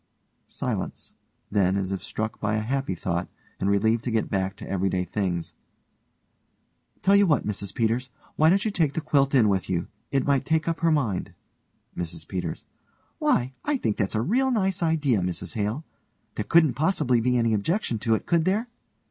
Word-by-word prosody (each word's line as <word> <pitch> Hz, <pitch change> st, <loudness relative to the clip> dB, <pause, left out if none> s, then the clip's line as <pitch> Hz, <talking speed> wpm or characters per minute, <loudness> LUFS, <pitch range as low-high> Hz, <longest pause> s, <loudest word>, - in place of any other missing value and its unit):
(silence; -, -, -4 dB, 0.4 s
then 100 Hz, -2 st, +2 dB
as 95 Hz, -1 st, -2 dB
if 95 Hz, -, -3 dB
struck 110 Hz, 0 st, -4 dB
by 105 Hz, 0 st, 0 dB
a -, -, +1 dB
happy 130 Hz, -3 st, -1 dB
thought 85 Hz, 0 st, -2 dB, 0.3 s
and 95 Hz, -, 0 dB
relieved 110 Hz, +3 st, +2 dB
to -, -, -2 dB
get 110 Hz, -2 st, 0 dB
back 95 Hz, -1 st, -1 dB
to -, -, -10 dB
everyday 95 Hz, -1 st, 0 dB
things) 90 Hz, -2 st, -2 dB, 1.5 s
Tell 195 Hz, -, +5 dB
you 200 Hz, -1 st, +5 dB
what, 150 Hz, -5 st, +2 dB
Mrs 100 Hz, -1 st, -2 dB
Peters, 120 Hz, +2 st, 0 dB, 0.3 s
why 155 Hz, +1 st, +5 dB
don't 195 Hz, +4 st, +3 dB
you 215 Hz, -, +1 dB
take 160 Hz, -7 st, +1 dB
the -, -, -1 dB
quilt 140 Hz, -2 st, +2 dB
in 120 Hz, -5 st, +5 dB
with 95 Hz, -2 st, 0 dB
you? 85 Hz, -2 st, -1 dB, 0.2 s
It 135 Hz, -1 st, +1 dB
might 140 Hz, -2 st, +2 dB
take 160 Hz, 0 st, 0 dB
up 165 Hz, -1 st, -1 dB
her 165 Hz, -, +3 dB
mind. 125 Hz, -, 0 dB, 0.6 s
MRS 85 Hz, -1 st, -5 dB
PETERS: 90 Hz, -4 st, -4 dB, 0.5 s
Why, 125 Hz, +2 st, +1 dB
I 295 Hz, -1 st, +1 dB
think 105 Hz, -, -1 dB
that's 100 Hz, +1 st, 0 dB
a 110 Hz, -, +1 dB
real 260 Hz, -, +2 dB
nice 195 Hz, -6 st, 0 dB
idea, 155 Hz, -9 st, +2 dB
Mrs 90 Hz, -1 st, -3 dB
Hale. 110 Hz, +7 st, -2 dB, 0.5 s
There -, -, -3 dB
couldn't 165 Hz, -5 st, +5 dB
possibly 145 Hz, -6 st, +2 dB
be 125 Hz, +1 st, +2 dB
any 115 Hz, -1 st, +2 dB
objection 115 Hz, -, 0 dB
to 110 Hz, +1 st, +2 dB
it, -, -, -4 dB
could 170 Hz, -2 st, +2 dB
there? 215 Hz, +6 st, 0 dB
115 Hz, 185 wpm, -26 LUFS, 100-160 Hz, 1.5 s, Tell